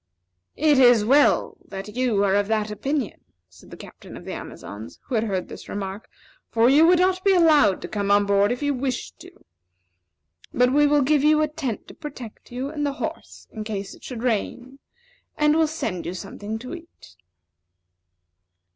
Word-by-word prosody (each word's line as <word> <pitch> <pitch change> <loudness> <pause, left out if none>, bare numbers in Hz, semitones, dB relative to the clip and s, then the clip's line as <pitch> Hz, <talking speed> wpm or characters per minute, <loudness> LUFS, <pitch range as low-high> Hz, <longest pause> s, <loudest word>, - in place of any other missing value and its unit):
"It 295 -2 +4
is 245 -4 +6
well 280 +5 +3
that 195 +2 -9
you 245 -5 +1
are 195 -1 +2
of 205 0 +2
that 215 -1 -1
opinion," 270 +3 -3 0.3
said 90 -2 -18
the - - -11
Captain - - -12
of - - -12
the - - -5
Amazons, 105 +3 -9
who - - -9
had 225 -1 +1
heard 190 -4 -2
this - - -11
remark; 200 +1 -6 0.4
"for 230 +2 +3
you 310 +4 +6
would 360 +1 +5
not 370 +1 +1
be 390 -1 +4
allowed 300 - +4
to - - -4
come 200 -1 -3
on 205 0 +4
board 200 +1 +2
if 245 +4 -3
you 285 0 +1
wished 250 - -4
to. - - -12 1.2
But 250 +1 +2
we 295 +1 +4
will 290 -1 +3
give 290 +1 +2
you 305 0 +4
a - - +1
tent 290 -7 -5
to - - -11
protect 260 -9 -10
you 255 +3 -4
and 300 -1 -4
the 285 -1 -1
horse - - -7
in 220 - -6
case 200 -2 -5
it - - -17
should 245 -2 -7
rain, 250 +3 -2 0.6
and 300 0 +3
will 320 -1 +3
send 280 - -4
you 175 - -4
something 205 +3 -6
to 250 +6 -8
eat." 330 - -13
245 Hz, 190 wpm, -23 LUFS, 205-295 Hz, 1.2 s, is